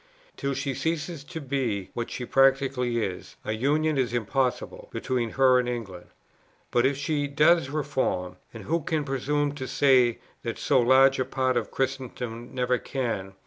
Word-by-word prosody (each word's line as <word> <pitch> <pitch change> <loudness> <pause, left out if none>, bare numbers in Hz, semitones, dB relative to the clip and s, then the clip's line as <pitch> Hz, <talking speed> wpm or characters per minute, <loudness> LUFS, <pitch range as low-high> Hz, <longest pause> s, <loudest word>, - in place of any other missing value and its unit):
Till 140 0 -2
she 135 0 -2
ceases 155 +2 -3
to 160 - -7
be 130 -9 -2
what 120 -1 -3
she 125 - -5
practically 135 -3 +2
is, 95 -2 -7
a - - -2
union 145 +6 +1
is 120 -2 0
impossible 125 +3 -1
between 125 -3 -1
her 130 -1 +6
and 125 -1 -1
England; 100 -8 -6 0.6
but, 120 +2 +4
if 140 0 -1
she 145 0 -1
does 155 +1 +3
reform, 130 -11 -2
(and 115 -3 -9
who 165 +9 0
can 155 0 -1
presume 145 +2 0
to 135 -3 -6
say 125 -4 +4 0.2
that 115 - -4
so 135 - +2
large 130 +2 +5
a - - +3
part 130 0 0
of 120 -3 -1
Christendom 125 -3 -4
never 125 -1 0
can?) 110 -8 -3
130 Hz, 165 wpm, -26 LUFS, 120-140 Hz, 0.6 s, her